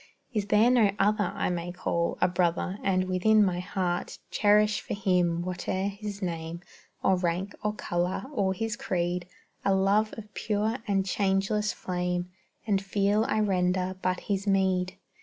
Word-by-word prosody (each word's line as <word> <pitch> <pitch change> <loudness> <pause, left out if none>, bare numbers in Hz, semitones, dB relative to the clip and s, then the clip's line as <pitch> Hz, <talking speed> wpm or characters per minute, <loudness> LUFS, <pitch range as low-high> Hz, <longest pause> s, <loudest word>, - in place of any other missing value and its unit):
Is 210 -3 -1
there 215 +4 +5
no 235 -5 +5
other 205 -1 +2
I - - 0
may 175 0 -3
call 170 -1 -1
A 180 - +5
brother, 180 +2 0
and 185 -1 +2
within 210 +4 +4
my 180 -2 0
heart 180 -1 -2
Cherish 210 0 +3
for - - -4
him, 180 -4 +1
whate'er 185 +2 -2
his 200 0 -6
name, 165 -1 -4 0.4
Or 190 -1 +4
rank, 180 +3 -1
or 210 0 0
color, 175 -2 -1
or 195 -6 +1
his 225 +2 -2
creed, 175 -3 -2 0.4
A 195 -1 +3
love 200 +3 +3
of 210 -1 -10
pure 215 +2 -1
and 195 -2 +1
changeless 195 +2 +1
flame, 180 0 -3 0.3
And 200 -3 +1
feel 200 +2 +1
I 215 - +1
render 185 -2 +1
but 185 0 0
his 200 0 -2
meed? 190 -1 +1
190 Hz, 160 wpm, -28 LUFS, 180-210 Hz, 0.4 s, there